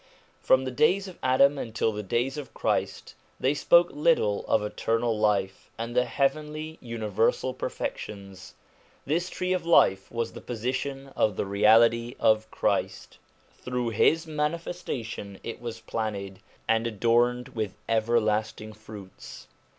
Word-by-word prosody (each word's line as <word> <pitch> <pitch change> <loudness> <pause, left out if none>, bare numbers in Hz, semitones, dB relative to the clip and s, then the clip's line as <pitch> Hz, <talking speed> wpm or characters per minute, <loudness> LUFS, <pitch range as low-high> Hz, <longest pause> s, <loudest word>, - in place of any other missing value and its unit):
From 130 0 +3
the 130 - -3
days 180 +10 +2
of 185 - -11
Adam 135 +2 +4
until 110 0 -1
the 105 0 -4
days 120 +6 -1
of 145 -4 -8
Christ, - - -2 0.3
they 135 +2 +2
spoke 170 +4 +4
little 145 -10 +2
of 110 - +2
eternal 115 +2 -1
life 100 -3 0
and 115 +1 -5
the 125 0 +3
heavenly 155 +3 -2
universal 115 +1 -1
perfections. 100 -6 -6 0.5
This 170 +5 0
tree 185 0 -2
of 180 -2 -1
life 95 - +3
was 115 -1 -3
the - - -9
position 130 +4 -4
of 105 -3 +1
the - - -2
Reality 115 +4 +4
of 110 0 +3
Christ; - - -2 0.4
through 125 -1 -2
his 160 +9 +3
manifestation 150 - -4
it 115 - -6
was 115 -2 -6
planted, 100 -4 -4 0.3
and 115 +1 +2
adorned 120 +3 +1
with 110 -4 -4
everlasting 110 -1 0
fruits. 105 -3 -11
115 Hz, 135 wpm, -27 LUFS, 110-140 Hz, 0.5 s, Adam